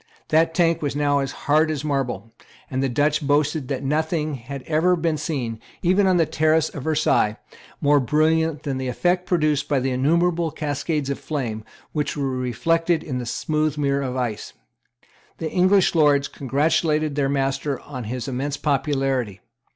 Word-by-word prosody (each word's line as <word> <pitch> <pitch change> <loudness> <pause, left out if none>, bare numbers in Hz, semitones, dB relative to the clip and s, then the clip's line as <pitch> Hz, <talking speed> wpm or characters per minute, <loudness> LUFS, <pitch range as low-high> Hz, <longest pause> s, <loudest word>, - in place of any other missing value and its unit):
That 160 +1 +3
tank 165 -2 +2
was 145 -2 -2
now 145 -1 +2
as 135 -1 -2
hard 155 +2 +3
as 155 -1 -3
marble; 135 -6 -2 0.4
and 130 0 -1
the 135 - +1
Dutch 145 +4 +1
boasted 145 0 +1
that 135 -1 -3
nothing 155 +2 0
had 135 +1 -7
ever 165 +5 +2
been 165 -2 0
seen, 135 -7 -3 0.2
even 190 +3 +3
on 185 -1 +3
the 165 - +4
terrace 155 +1 +2
of 140 - -8
Versailles, 140 -9 +2 0.4
more 145 0 +4
brilliant 155 +3 +1
than 135 -2 -2
the 130 - -3
effect 175 +8 0
produced 155 -5 +1
by 145 -2 +2
the 130 +1 -1
innumerable 165 +6 +1
cascades 150 -1 -2
of 140 - -4
flame 120 -8 -4 0.3
which 150 -1 -2
were 140 -2 -1
reflected 165 +7 0
in 130 -5 -3
the 120 - -5
smooth 155 +3 -1
mirror 140 -1 +1
of 130 -2 -3
ice. 120 -5 -3 0.8
The 160 -1 -4
English 185 +1 +4
Lords 145 -4 +4
congratulated 155 +2 0
their 140 -1 0
master 135 0 -1
on 130 -5 -8
his 125 +3 -4
immense 135 +2 -2
popularity. 135 -8 -1
145 Hz, 165 wpm, -23 LUFS, 135-160 Hz, 0.8 s, the